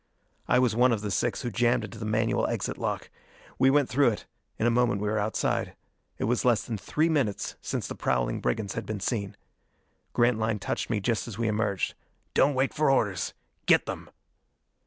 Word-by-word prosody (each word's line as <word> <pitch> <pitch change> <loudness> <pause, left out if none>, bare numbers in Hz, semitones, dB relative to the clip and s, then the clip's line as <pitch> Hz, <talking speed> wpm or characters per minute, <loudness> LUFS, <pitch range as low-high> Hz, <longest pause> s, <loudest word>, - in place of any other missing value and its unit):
I - - +4
was 125 -3 +3
one 125 +2 +5
of 110 -3 0
the 105 -1 -3
six 120 +6 0
who 120 - -2
jammed 120 +3 +2
into 110 0 -8
the 110 - -4
manual 110 +1 +1
exit - - -3
lock. - - -3 0.5
We 130 - +6
went 145 -1 +4
through 140 +2 +3
it: 110 -3 -1 0.3
in 110 - 0
a 120 - +4
moment 120 -3 +2
we 105 - -2
were 110 +1 +1
outside. 105 +2 -1 0.4
It - - -3
was 120 +2 +1
less 120 -4 +3
than 115 - -4
three 155 - +1
minutes 140 -11 0
since - - -3
the - - -5
prowling - - 0
brigands 110 -3 -1
had - - -5
been 110 -1 -3
seen. 100 -1 -2 0.8
Grantline 110 -2 +2
touched 105 - -3
me 110 -3 0
just 115 +2 0
as 110 -4 -7
we 115 -1 0
emerged. 105 -3 0 0.4
"Don't 145 0 +4
wait 135 +1 +1
for 150 -1 +2
orders! 105 -9 +1 0.3
Get - - +5
them!" - - -6
115 Hz, 200 wpm, -28 LUFS, 105-125 Hz, 0.8 s, We